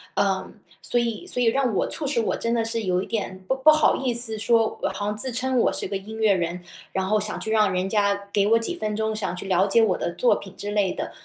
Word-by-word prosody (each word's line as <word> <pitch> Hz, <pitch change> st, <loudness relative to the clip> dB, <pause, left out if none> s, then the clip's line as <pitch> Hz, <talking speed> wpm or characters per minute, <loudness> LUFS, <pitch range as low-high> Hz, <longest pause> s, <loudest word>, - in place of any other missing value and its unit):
呃， 195 Hz, -1 st, 0 dB, 0.3 s
所 240 Hz, -, +2 dB
以 235 Hz, +7 st, -2 dB
所 250 Hz, -9 st, -1 dB
以 240 Hz, -, +3 dB
让 255 Hz, 0 st, +1 dB
我 -, -, +1 dB
促 310 Hz, -, +2 dB
使 270 Hz, -4 st, +1 dB
我 225 Hz, -, -1 dB
真 230 Hz, -, -2 dB
的 230 Hz, -1 st, +1 dB
是 225 Hz, 0 st, -3 dB
有 180 Hz, -2 st, 0 dB
一 -, -, -6 dB
点 205 Hz, -4 st, -4 dB
不 265 Hz, -, +1 dB
不 265 Hz, +4 st, +6 dB
好 310 Hz, 0 st, +4 dB
意 255 Hz, -2 st, -1 dB
思 230 Hz, -2 st, +1 dB
说 225 Hz, 0 st, +1 dB
好 205 Hz, -, -4 dB
像 210 Hz, 0 st, -2 dB
自 260 Hz, +4 st, +2 dB
称 255 Hz, +2 st, -1 dB
我 -, -, +2 dB
是 -, -, -3 dB
个 195 Hz, +1 st, -3 dB
音 210 Hz, +3 st, -9 dB
乐 220 Hz, -2 st, +4 dB
人， 175 Hz, -1 st, -2 dB, 0.3 s
然 190 Hz, 0 st, -2 dB
后 215 Hz, +2 st, +2 dB
想 210 Hz, 0 st, -3 dB
去 -, -, -5 dB
让 215 Hz, -3 st, +3 dB
人 185 Hz, +1 st, -1 dB
家 200 Hz, -1 st, 0 dB
给 200 Hz, -1 st, +2 dB
我 225 Hz, +2 st, +4 dB
几 230 Hz, +10 st, -3 dB
分 215 Hz, -9 st, -3 dB
钟， 220 Hz, 0 st, -1 dB
想 215 Hz, -, -2 dB
要 -, -, -6 dB
去 180 Hz, -, -6 dB
了 185 Hz, 0 st, +3 dB
解 215 Hz, +4 st, +4 dB
我 215 Hz, -5 st, +2 dB
的 170 Hz, -, -3 dB
作 245 Hz, -, +3 dB
品 195 Hz, -1 st, -9 dB
之 205 Hz, -, -5 dB
类 205 Hz, -3 st, +1 dB
的。 -, -, -5 dB
215 Hz, 300 characters per minute, -24 LUFS, 195-235 Hz, 0.3 s, 不